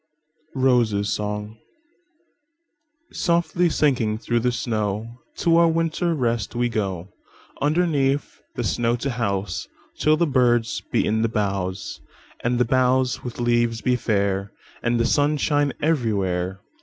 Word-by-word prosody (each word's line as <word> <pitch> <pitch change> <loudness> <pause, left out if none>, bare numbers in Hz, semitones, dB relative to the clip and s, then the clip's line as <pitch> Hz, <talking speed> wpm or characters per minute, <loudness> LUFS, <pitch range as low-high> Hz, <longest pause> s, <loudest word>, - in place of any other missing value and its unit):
ROSES' 115 -6 +2
SONG"SOFTLY 300 - -4
sinking 125 -9 +1
through 120 +1 0
the 125 +1 +1
snow, 110 0 -3 0.2
To 165 -1 +3
our 170 0 +6
winter 165 +1 0
rest 120 -5 -1
we 120 0 +1
go, 95 -5 -3 0.5
Underneath 145 - +1
the - - -2
snow 120 0 +1
to 130 +3 -3
houseTill 100 - -2
the 170 - +3
birds 120 -5 +2
be - - +2
in 110 +1 +1
the 115 - +1
boughs, 95 -3 -2 0.4
And 120 0 +1
the 125 - +3
boughs 130 0 +2
with 125 -1 -7
leaves 120 -1 +1
be 125 +3 +2
fair, 100 -4 0 0.3
And 120 0 +1
the 115 - +2
sun 145 +3 +2
shine 145 -1 +1
everywhere. 100 - 0
120 Hz, 125 wpm, -23 LUFS, 105-150 Hz, 0.5 s, our